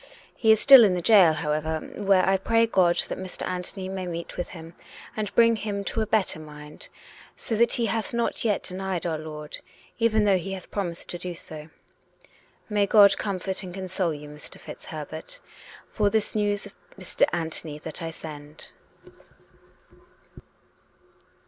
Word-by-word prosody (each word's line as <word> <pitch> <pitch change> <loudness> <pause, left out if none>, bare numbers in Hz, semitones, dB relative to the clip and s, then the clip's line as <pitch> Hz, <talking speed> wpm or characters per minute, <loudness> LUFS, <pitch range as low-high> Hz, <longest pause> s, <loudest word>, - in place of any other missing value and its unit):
He 220 -2 +4
is 220 - +5
still 270 -1 +9
in 195 -4 +3
the 180 - -2
gaol, 190 -7 +6
however, 155 +1 -2
where 195 -2 +2
I 195 - +4
pray 230 +4 +2
God 180 -6 +3
that - - -5
Mr. 185 -1 -6
Anthony 185 +1 -4
may 190 -1 -4
meet 170 -1 -6
with 175 - -4
him 165 -1 -10 0.4
and 210 -2 -3
bring 230 -1 +5
him 200 -1 -3
to 225 - -2
a 215 - -1
better 200 -7 +1
mind; 150 -1 -11 0.5
so 225 - -2
that 235 +1 +4
he 235 - +2
hath 225 +1 -2
not 235 -1 -1
yet 210 -3 0
denied 185 -1 -3
our 160 -2 -1
Lord, 150 -1 -8 0.4
even 220 -2 +3
though 195 -3 +3
he 195 +3 -5
hath 185 -2 -9
promised 180 -4 -3
to 175 - -5
do 180 0 -5
so. 155 -1 -8 0.5
" - - -27 0.3
May 205 -2 +1
God 200 -1 +7
comfort 190 -1 -2
and 185 -2 -8
console 185 -2 -1
you, 150 0 -10
Mr. 150 0 -11
FitzHerbert, - - -8 0.5
for 205 -1 +2
this 215 0 +1
news 205 -1 0
of 200 - -11 0.2
Mr. 185 -2 +1
Anthony 160 -2 -4
that 150 - -6
1 165 0 -4
send." 150 -1 -10
190 Hz, 170 wpm, -25 LUFS, 165-210 Hz, 0.5 s, still